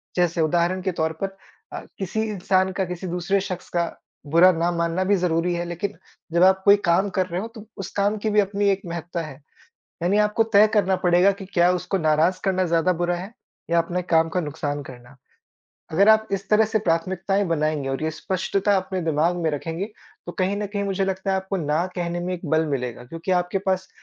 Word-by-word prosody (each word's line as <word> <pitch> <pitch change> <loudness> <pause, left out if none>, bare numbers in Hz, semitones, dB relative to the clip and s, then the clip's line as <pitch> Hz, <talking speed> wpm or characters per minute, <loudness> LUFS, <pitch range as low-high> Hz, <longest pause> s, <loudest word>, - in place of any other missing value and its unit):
जैसे 175 -2 +1
उदाहरण 175 +3 +1
के 190 0 -1
तौर 160 -2 -1
पर - - +2 0.5
अ, - - -4 0.2
किसी 195 +3 -2
इंसान 190 -1 +1
का 190 +1 -1
किसी 180 +1 -6
दूसरे 180 +3 0
शख़्स 185 -2 -6
का 170 -1 0 0.5
बुरा 175 +3 +7
ना 170 0 0
मानना 170 +1 0
भी 200 +2 +3
ज़रूरी 175 -1 0
है 175 0 -2
लेकिन 175 +4 -4 0.4
जब 170 +1 +4
आप 190 0 +5
कोई 200 0 +8
काम 185 +3 +3
कर 185 - +3
रहे 180 +1 -3
हो 220 - -5
तो 220 -1 -10
उस 195 - -5
काम 205 +2 +1
की 220 - +1
भी 210 0 +3
अपनी 200 0 +1
एक 195 0 +1
महत्ता 170 0 -4
है, 150 -1 -11 0.6
यानी 190 +4 +2
आपको 210 +1 +3
तय 215 -1 +5
करना 195 -3 +3
पड़ेगा 175 +3 +5
कि 195 0 -8
क्या 175 0 +4
उसको 180 +2 -1
नाराज़ 160 +2 +2
करना 185 -1 +1
ज़्यादा 170 +1 +2
बुरा 175 +1 -1
है? 190 +5 -7 0.4
या 170 - +3
अपने 175 +2 -1
काम 165 -2 +2
का 180 - -1
नुकसान 145 -2 -3
करना? 125 0 -13 0.8
अगर 195 +6 +4
आप 220 0 +5
इस 195 -1 -3
तरह 215 +1 +5
से 220 +1 0
प्राथमिकताएँ 190 +2 0
बनाएँगे 155 -4 -1
और 135 +2 -3
ये 160 - 0
स्पष्टता 190 +4 0
अपने 190 0 -2
दिमाग 160 +2 +1
में 160 - +1
रखेंगे, 165 +5 -3 0.4
तो 175 - -5
कहीं 190 +2 -1
न 205 0 -2
कहीं 200 0 -3
मुझे 195 0 0
लगता 190 0 -2
है 190 - +2
आपको 190 +1 -3
ना 155 0 0
कहने 175 0 -2
में 180 +1 -3
एक 175 - -7
बल 160 0 +2
मिलेगा, 125 -4 -3
क्योंकि 165 +8 -6
आपके 180 +2 -1
पास 190 -1 -1
180 Hz, 215 wpm, -23 LUFS, 165-195 Hz, 0.8 s, कोई